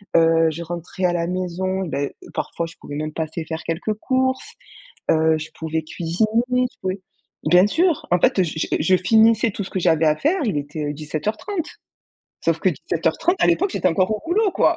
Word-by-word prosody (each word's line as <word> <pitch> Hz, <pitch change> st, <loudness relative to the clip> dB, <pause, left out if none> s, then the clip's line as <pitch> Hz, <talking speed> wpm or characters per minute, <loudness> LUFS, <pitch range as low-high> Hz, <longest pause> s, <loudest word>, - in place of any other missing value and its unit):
Heu, 165 Hz, 0 st, +5 dB
je 170 Hz, +2 st, -6 dB
rentrais 175 Hz, +2 st, -4 dB
à 175 Hz, -, +2 dB
la 170 Hz, -1 st, -1 dB
maison, 185 Hz, +1 st, -2 dB
ben 140 Hz, -2 st, -2 dB, 0.2 s
parfois 170 Hz, -, -3 dB
je 165 Hz, -, -13 dB
pouvais 145 Hz, -, -8 dB
même 155 Hz, +1 st, -3 dB
passer 160 Hz, 0 st, -4 dB
faire 160 Hz, 0 st, -5 dB
quelques 170 Hz, +6 st, -2 dB
courses, 260 Hz, +3 st, -1 dB, 0.6 s
heu, 160 Hz, 0 st, +3 dB
je 160 Hz, +1 st, -7 dB
pouvais 160 Hz, 0 st, -2 dB
cuisiner, 170 Hz, +5 st, -1 dB, 0.3 s
je 250 Hz, 0 st, +1 dB
pouvais 185 Hz, +1 st, -3 dB, 0.4 s
bien 180 Hz, +4 st, +6 dB
sûr, 330 Hz, -, +1 dB
en 180 Hz, -, +4 dB
fait, 185 Hz, +2 st, +3 dB
je 160 Hz, -, -3 dB
j -, -, -1 dB
je 185 Hz, +4 st, +4 dB
finissais 220 Hz, +4 st, +4 dB
tout 200 Hz, -, -4 dB
ce 190 Hz, -, -8 dB
que 190 Hz, -, -1 dB
j'avais 165 Hz, -2 st, +3 dB
à 155 Hz, 0 st, +4 dB
faire, 320 Hz, -, +1 dB
il 200 Hz, -9 st, 0 dB
était, 145 Hz, +1 st, -4 dB
heu, -, -, -3 dB
17:30. 215 Hz, -, -3 dB, 0.8 s
Sauf -, -, +2 dB
que -, -, +3 dB
17:30, 355 Hz, +2 st, 0 dB
à -, -, +5 dB
l'époque, 365 Hz, +3 st, +2 dB
j'étais 185 Hz, -, +1 dB
encore 185 Hz, +3 st, +1 dB
au 215 Hz, -, -1 dB
boulot 405 Hz, +4 st, +2 dB
quoi, -, -, +3 dB
180 Hz, 200 wpm, -22 LUFS, 160-220 Hz, 0.8 s, bien